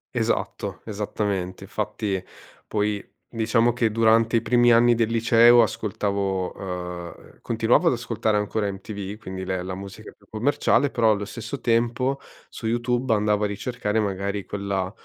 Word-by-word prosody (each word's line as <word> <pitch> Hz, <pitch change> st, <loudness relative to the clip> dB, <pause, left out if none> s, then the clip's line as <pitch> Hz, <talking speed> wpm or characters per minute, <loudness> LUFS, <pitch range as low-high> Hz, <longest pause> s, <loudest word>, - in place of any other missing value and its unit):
Esatto, -, -, -2 dB
esattamente. 100 Hz, -3 st, -3 dB
Infatti 105 Hz, -2 st, -3 dB, 0.4 s
poi, 105 Hz, -1 st, -1 dB, 0.2 s
diciamo 115 Hz, +1 st, +1 dB
che 115 Hz, -2 st, +1 dB
durante 115 Hz, +1 st, +3 dB
i -, -, +1 dB
primi 120 Hz, +1 st, +4 dB
anni 120 Hz, +1 st, +5 dB
del 115 Hz, -1 st, +1 dB
liceo, 120 Hz, +1 st, +6 dB
ascoltavo, 100 Hz, -3 st, -1 dB
uhm, 90 Hz, -2 st, -7 dB
continuavo -, -, +2 dB
ad -, -, +4 dB
ascoltare 110 Hz, -1 st, -1 dB
ancora 105 Hz, 0 st, -1 dB
in 100 Hz, -, -3 dB
MTV, 100 Hz, 0 st, -7 dB
quindi 95 Hz, -3 st, -6 dB
le 95 Hz, -1 st, -2 dB
la 95 Hz, 0 st, -5 dB
musica 100 Hz, +3 st, -9 dB
più 100 Hz, -, -26 dB
commerciale, 125 Hz, +3 st, +2 dB
però 115 Hz, -2 st, +3 dB
allo 105 Hz, -1 st, -1 dB
stesso 115 Hz, +5 st, -6 dB
tempo 120 Hz, +3 st, +1 dB, 0.3 s
su 115 Hz, -, -6 dB
YouTube 120 Hz, +1 st, 0 dB
andava 105 Hz, 0 st, +1 dB
a -, -, +2 dB
ricercare 105 Hz, +1 st, -2 dB
magari 100 Hz, -1 st, -2 dB
quella 100 Hz, -2 st, -3 dB
105 Hz, 150 wpm, -24 LUFS, 100-115 Hz, 0.4 s, liceo